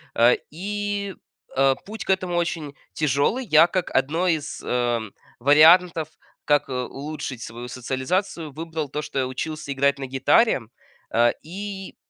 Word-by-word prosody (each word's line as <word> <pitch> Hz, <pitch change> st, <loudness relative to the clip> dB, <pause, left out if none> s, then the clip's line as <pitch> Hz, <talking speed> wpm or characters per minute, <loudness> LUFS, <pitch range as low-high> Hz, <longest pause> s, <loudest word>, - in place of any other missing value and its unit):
Э, 120 Hz, +1 st, +6 dB, 0.2 s
и, 200 Hz, +2 st, -3 dB, 0.4 s
э, 135 Hz, 0 st, +4 dB
путь 220 Hz, +2 st, -7 dB
к -, -, -14 dB
этому 185 Hz, -2 st, +1 dB
очень 165 Hz, -4 st, -2 dB, 0.2 s
тяжелый. 155 Hz, -, +1 dB
Я, 160 Hz, -4 st, +6 dB
как 185 Hz, 0 st, -2 dB
одно 155 Hz, +7 st, +1 dB
из, 155 Hz, -4 st, -1 dB
эм, 120 Hz, -4 st, -1 dB, 0.3 s
вариантов, 160 Hz, +4 st, +6 dB, 0.4 s
как, 145 Hz, -1 st, +3 dB
э, -, -, -4 dB
улучшить 135 Hz, 0 st, -5 dB
свою 120 Hz, +2 st, -7 dB
социализацию, 145 Hz, -, -2 dB
выбрал 160 Hz, 0 st, -5 dB
то, 150 Hz, +3 st, -3 dB
что 140 Hz, -, -4 dB
я 130 Hz, -, 0 dB
учился 145 Hz, +3 st, -5 dB
играть 140 Hz, +1 st, +2 dB
на 135 Hz, -, -4 dB
гитаре. 135 Hz, -, +3 dB, 0.5 s
А, 120 Hz, 0 st, +4 dB
и 195 Hz, +3 st, -7 dB
150 Hz, 145 wpm, -24 LUFS, 130-180 Hz, 0.5 s, Э